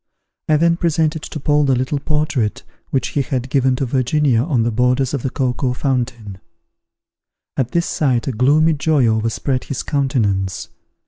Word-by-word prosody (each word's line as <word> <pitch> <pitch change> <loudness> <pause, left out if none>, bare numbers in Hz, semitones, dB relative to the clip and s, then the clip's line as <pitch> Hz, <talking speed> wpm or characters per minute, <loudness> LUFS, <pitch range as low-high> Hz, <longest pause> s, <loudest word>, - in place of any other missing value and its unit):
I 155 - +5
then 170 +2 +2
presented 160 -2 0
to 155 - -6
Paul 145 +1 +2
the 135 -2 +3
little 130 +3 -1
portrait 150 -7 -1 0.3
which 135 - -1
he 145 - 0
had 130 -1 -3
given 130 -2 +2
to 135 - -1
Virginia 130 0 +1
on 130 -5 +1
the 120 - 0
borders 125 +3 +1
of 140 - -1
the 130 - -2
cocoa 125 0 -1
tree - - -13
fountain. 120 -7 -2 1.2
At 130 -3 -1
this 170 +5 0
sight 130 -5 0
a - - +1
gloomy 145 +7 +3
joy 150 -2 +2
overspread 115 +4 0
his 140 - -4
countenance. 100 - -1
130 Hz, 170 wpm, -19 LUFS, 120-150 Hz, 1.2 s, I